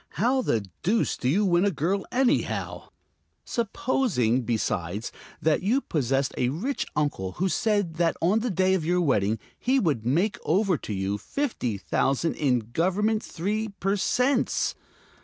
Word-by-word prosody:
How 255 Hz, +4 st, +2 dB
the 110 Hz, -, 0 dB, 0.2 s
deuce 220 Hz, +5 st, +1 dB
do 125 Hz, -, -1 dB
you 200 Hz, +9 st, +2 dB
win 175 Hz, -1 st, +3 dB
a 205 Hz, -, +4 dB
girl, 190 Hz, +3 st, -1 dB
anyhow? 255 Hz, 0 st, 0 dB, 0.6 s
Supposing, 200 Hz, -, 0 dB
besides, 105 Hz, -3 st, -2 dB, 0.3 s
that 155 Hz, -1 st, +3 dB
you 220 Hz, +9 st, +2 dB
possessed 135 Hz, -, -1 dB
a 125 Hz, -, +2 dB
rich 220 Hz, -, -2 dB
uncle 145 Hz, -11 st, -1 dB
who 190 Hz, -, 0 dB
said 205 Hz, -5 st, 0 dB
that 170 Hz, -1 st, +1 dB
on 190 Hz, +6 st, +3 dB
the 245 Hz, +2 st, -1 dB
day 185 Hz, -1 st, +2 dB
of 185 Hz, -4 st, +1 dB
your 175 Hz, +3 st, +1 dB
wedding 110 Hz, -, +2 dB, 0.2 s
he 265 Hz, +2 st, +2 dB
would 150 Hz, -, 0 dB
make 170 Hz, -, +1 dB
over 190 Hz, +2 st, +2 dB
to 110 Hz, -, -5 dB
you 95 Hz, +1 st, -2 dB
fifty 125 Hz, -, -2 dB
thousand 135 Hz, +10 st, 0 dB
in 125 Hz, -6 st, 0 dB
Government 210 Hz, +7 st, +1 dB
three 210 Hz, +6 st, -2 dB
per 195 Hz, +2 st, +1 dB
cents? 250 Hz, +5 st, +1 dB
175 Hz, 155 wpm, -26 LUFS, 130-215 Hz, 0.6 s, a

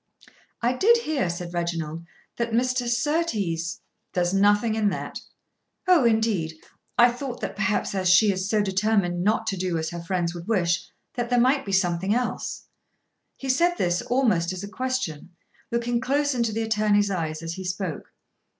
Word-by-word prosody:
"I 240 Hz, +2 st, +3 dB
did 465 Hz, -, +5 dB
hear," 310 Hz, -, -1 dB
said 175 Hz, 0 st, -5 dB
Reginald, 165 Hz, -2 st, -3 dB, 0.3 s
"that 235 Hz, -1 st, -2 dB
Mr. 250 Hz, +1 st, +1 dB
Surtees 235 Hz, -, -1 dB, 0.2 s
" -, -, -52 dB
"There's 175 Hz, 0 st, +1 dB
nothing 205 Hz, +3 st, +3 dB
in 215 Hz, -2 st, +2 dB
that." -, -, -5 dB, 0.7 s
"Oh, 350 Hz, -8 st, +5 dB
indeed. 220 Hz, -8 st, +1 dB, 0.4 s
I 240 Hz, 0 st, +7 dB
thought 245 Hz, 0 st, -6 dB
that -, -, -4 dB
perhaps 205 Hz, -1 st, 0 dB
as 185 Hz, -2 st, +1 dB
she 200 Hz, +3 st, +6 dB
is 190 Hz, +1 st, -3 dB
so 215 Hz, -2 st, +2 dB
determined 190 Hz, -3 st, +1 dB
not 215 Hz, +2 st, +1 dB
to 200 Hz, -3 st, -2 dB
do 180 Hz, -2 st, -1 dB
as 160 Hz, +1 st, -3 dB
her 170 Hz, 0 st, -5 dB
friends 170 Hz, 0 st, -1 dB
would 170 Hz, 0 st, -8 dB
wish, 175 Hz, -5 st, +1 dB, 0.2 s
that 240 Hz, -1 st, -3 dB
there 245 Hz, 0 st, +3 dB
might 260 Hz, +1 st, +2 dB
be -, -, -2 dB
something 190 Hz, +1 st, +1 dB
else." 245 Hz, 0 st, -2 dB, 0.7 s
He 270 Hz, -, -7 dB
said 340 Hz, +7 st, +3 dB
this 175 Hz, -, 0 dB
almost 220 Hz, -10 st, +1 dB
as 185 Hz, +1 st, -5 dB
a -, -, -5 dB
question, 205 Hz, -, -3 dB, 0.3 s
looking 235 Hz, 0 st, 0 dB
close 285 Hz, +2 st, +1 dB
into 235 Hz, -3 st, 0 dB
the 225 Hz, +1 st, -1 dB
attorney's 210 Hz, -2 st, +2 dB
eyes 160 Hz, -3 st, -3 dB
as 165 Hz, 0 st, -4 dB
he 190 Hz, -, -6 dB
spoke. 185 Hz, -2 st, -4 dB
205 Hz, 175 wpm, -25 LUFS, 175-240 Hz, 0.7 s, I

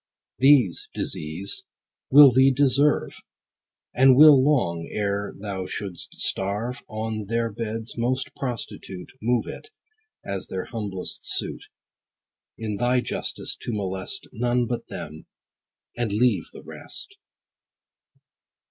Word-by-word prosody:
These, 130 Hz, -9 st, +4 dB
Disease, 80 Hz, +6 st, -2 dB, 0.5 s
will 140 Hz, 0 st, +9 dB
thee 130 Hz, +2 st, +5 dB
deserve; 140 Hz, +2 st, +2 dB, 0.7 s
And 130 Hz, +1 st, +6 dB
will 145 Hz, -2 st, +8 dB
long, 85 Hz, -, +1 dB
ere 100 Hz, -1 st, -1 dB
thou 95 Hz, -2 st, -5 dB
should'st 95 Hz, -4 st, -5 dB
starve, 105 Hz, +6 st, -1 dB
On 110 Hz, -1 st, -4 dB
their 115 Hz, +1 st, 0 dB
beds, 115 Hz, +1 st, -5 dB
most 130 Hz, +2 st, -1 dB
prostitute, 115 Hz, -7 st, -6 dB
Move 120 Hz, +1 st, +1 dB
it, 435 Hz, -, -9 dB, 0.6 s
as 100 Hz, -1 st, -4 dB
their 95 Hz, -1 st, -4 dB
humblest 100 Hz, -5 st, -5 dB
suit, -, -, -4 dB, 0.9 s
In 110 Hz, -2 st, -4 dB
thy 125 Hz, +2 st, +2 dB
justice -, -, -3 dB
to -, -, -5 dB
molest 95 Hz, -2 st, -4 dB
None 120 Hz, +2 st, 0 dB
but 120 Hz, 0 st, -4 dB
them, 80 Hz, -2 st, -8 dB, 0.7 s
and 120 Hz, -3 st, -2 dB
leave 120 Hz, +4 st, +2 dB
the -, -, -12 dB
rest. 400 Hz, 0 st, -8 dB
115 Hz, 110 wpm, -24 LUFS, 100-125 Hz, 0.9 s, will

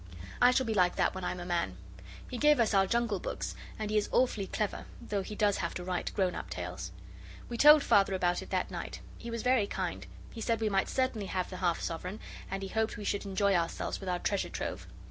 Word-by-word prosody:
I 245 Hz, -, +8 dB
shall 255 Hz, +1 st, +2 dB
be 225 Hz, -, 0 dB
like 180 Hz, -3 st, +3 dB
that -, -, +2 dB
when 190 Hz, -, -6 dB
I'm 180 Hz, -, -2 dB
a 175 Hz, -, -6 dB
man. 170 Hz, -, -1 dB, 0.5 s
He 245 Hz, -, -5 dB
gave 295 Hz, -1 st, +5 dB
us 225 Hz, -2 st, +3 dB
our 195 Hz, -1 st, +4 dB
Jungle 235 Hz, -3 st, +1 dB
books, -, -, -4 dB, 0.2 s
and 215 Hz, -1 st, -3 dB
he 215 Hz, -, +2 dB
is 205 Hz, -, -3 dB
awfully 220 Hz, -6 st, +2 dB
clever, 210 Hz, +1 st, -2 dB
though 205 Hz, -1 st, -2 dB
he 210 Hz, +2 st, -6 dB
does 205 Hz, -1 st, +2 dB
have 170 Hz, -, -3 dB
to 180 Hz, -, -4 dB
write 180 Hz, -1 st, -2 dB
grown 185 Hz, -3 st, +2 dB
up -, -, -6 dB
tales. 90 Hz, -1 st, -5 dB, 0.6 s
We 240 Hz, -, -4 dB
told 300 Hz, 0 st, +9 dB
Father 195 Hz, -1 st, +4 dB
about 175 Hz, -1 st, +1 dB
it -, -, -10 dB
that -, -, -1 dB
night. -, -, -5 dB, 0.2 s
He 235 Hz, -, -7 dB
was 230 Hz, -1 st, -3 dB
very 250 Hz, -5 st, +3 dB
kind. -, -, -3 dB, 0.2 s
He 225 Hz, -, -8 dB
said 230 Hz, 0 st, +1 dB
we 220 Hz, -1 st, +1 dB
might 195 Hz, -1 st, +1 dB
certainly 255 Hz, -6 st, 0 dB
have 185 Hz, -1 st, -2 dB
the 185 Hz, -, -5 dB
half 175 Hz, -2 st, 0 dB
sovereign, 180 Hz, +5 st, -4 dB, 0.3 s
and 195 Hz, +1 st, -3 dB
he 195 Hz, -, -4 dB
hoped 220 Hz, +1 st, 0 dB
we 210 Hz, -, -6 dB
should 200 Hz, 0 st, -1 dB
enjoy 200 Hz, 0 st, +2 dB
ourselves 170 Hz, -2 st, -1 dB
with 195 Hz, -, -5 dB
our 180 Hz, -, +1 dB
treasure 200 Hz, +2 st, -1 dB
trove. -, -, -4 dB
200 Hz, 240 wpm, -31 LUFS, 180-225 Hz, 0.6 s, told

